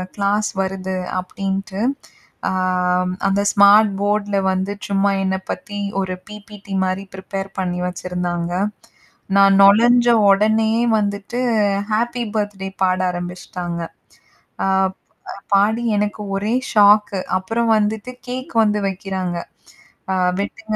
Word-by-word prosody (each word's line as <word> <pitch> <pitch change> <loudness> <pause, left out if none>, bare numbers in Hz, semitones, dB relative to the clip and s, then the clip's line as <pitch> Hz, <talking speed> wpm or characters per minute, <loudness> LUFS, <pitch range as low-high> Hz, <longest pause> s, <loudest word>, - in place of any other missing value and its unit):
Class 205 +1 0
வருது 190 0 -3 0.2
அப்படின்ட்டு, 195 +2 -4 0.7
ஆ, - - -1 0.8
அந்த 195 +1 +1
ஸ்மார்ட் 205 +1 +6
போர்டி 205 0 0
ல - - +3
வந்து 190 +2 -1
சும்மா 200 0 +2
என்னை 190 0 0
பத்தி 205 +3 -6 0.2
ஒரு 185 -1 -3 0.2
பிபிடி 210 -1 -10
மாதிரி 185 +1 -1
பிரிப்பேர் 195 +1 -5
பண்ணி 180 -1 -2
வெச்சிருந்தாங்க. 180 -1 -3 0.8
நான் 195 0 +6
நொழைஞ்ச 235 +5 +6 0.2
உடனேயே 220 +3 +3
வந்துட்டு 205 +3 -2 0.5
ஹேப்பி 240 +3 0
பர்த்டே 205 -2 -2
பாட 185 -1 +2
ஆரம்பிச்சுட்டாங்க. 175 -1 -5 0.8
ஆ, - - +1 0.9
பாடி 215 +4 +3
எனக்கு 210 0 -2
ஒரே 205 +3 -1 0.2
ஷாக்கு 210 -1 +5 0.2
அப்பறம் 225 +5 -1
வந்துட்டு 215 +3 -1 0.2
கேக் 255 +1 -6
வந்து 210 -1 +1
வைக்கிறாங்க. 190 -2 -3 0.8
ஆ, - - 0 0.2
வெட்டுங்க 215 +2 -4
200 Hz, 110 wpm, -20 LUFS, 190-210 Hz, 0.9 s, ஸ்மார்ட்